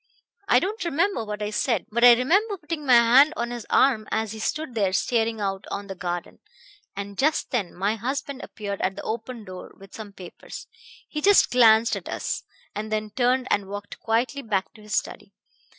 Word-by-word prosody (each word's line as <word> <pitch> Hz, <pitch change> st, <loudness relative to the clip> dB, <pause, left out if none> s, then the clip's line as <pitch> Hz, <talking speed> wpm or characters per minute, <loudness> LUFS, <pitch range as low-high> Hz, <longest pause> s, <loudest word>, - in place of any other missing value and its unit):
I 245 Hz, -, +5 dB
don't 395 Hz, -, -1 dB
remember 340 Hz, -, 0 dB
what 210 Hz, -1 st, -5 dB
I 210 Hz, -, -3 dB
said, 230 Hz, +3 st, 0 dB
but 235 Hz, +2 st, 0 dB
I 245 Hz, -1 st, +10 dB
remember 390 Hz, -, +1 dB
putting 300 Hz, -3 st, -6 dB
my 250 Hz, -, +7 dB
hand 250 Hz, +6 st, +6 dB
on 235 Hz, 0 st, -2 dB
his 240 Hz, -2 st, -7 dB
arm 230 Hz, -6 st, +3 dB
as 220 Hz, -1 st, -1 dB
he 220 Hz, -, -7 dB
stood 305 Hz, +4 st, -3 dB
there 200 Hz, -4 st, 0 dB
staring 225 Hz, +2 st, 0 dB
out 195 Hz, -1 st, -3 dB
on 200 Hz, -, -4 dB
the 195 Hz, -, -6 dB
garden; 175 Hz, -1 st, -5 dB, 0.6 s
and 200 Hz, 0 st, -7 dB
just 305 Hz, +3 st, +1 dB
then 210 Hz, -8 st, -2 dB
my 200 Hz, +4 st, -1 dB
husband 270 Hz, +4 st, -4 dB
appeared 200 Hz, -2 st, -6 dB
at 190 Hz, +1 st, -1 dB
the -, -, -7 dB
open 230 Hz, 0 st, -5 dB
door 185 Hz, -1 st, -10 dB
with 195 Hz, 0 st, -15 dB
some 215 Hz, -2 st, -8 dB
papers. 185 Hz, -3 st, -10 dB, 0.4 s
He 300 Hz, -, -5 dB
just 405 Hz, +4 st, +5 dB
glanced 230 Hz, -2 st, +5 dB
at -, -, -7 dB
us, -, -, -3 dB, 0.3 s
and 215 Hz, +1 st, -5 dB
then 215 Hz, 0 st, -2 dB
turned 255 Hz, +2 st, +1 dB
and 200 Hz, -1 st, +1 dB
walked 205 Hz, 0 st, -7 dB
quietly 240 Hz, +5 st, -1 dB
back 210 Hz, -6 st, -2 dB
to 215 Hz, -, -16 dB
his 210 Hz, -1 st, -4 dB
study. -, -, -4 dB
225 Hz, 200 wpm, -24 LUFS, 205-260 Hz, 0.6 s, I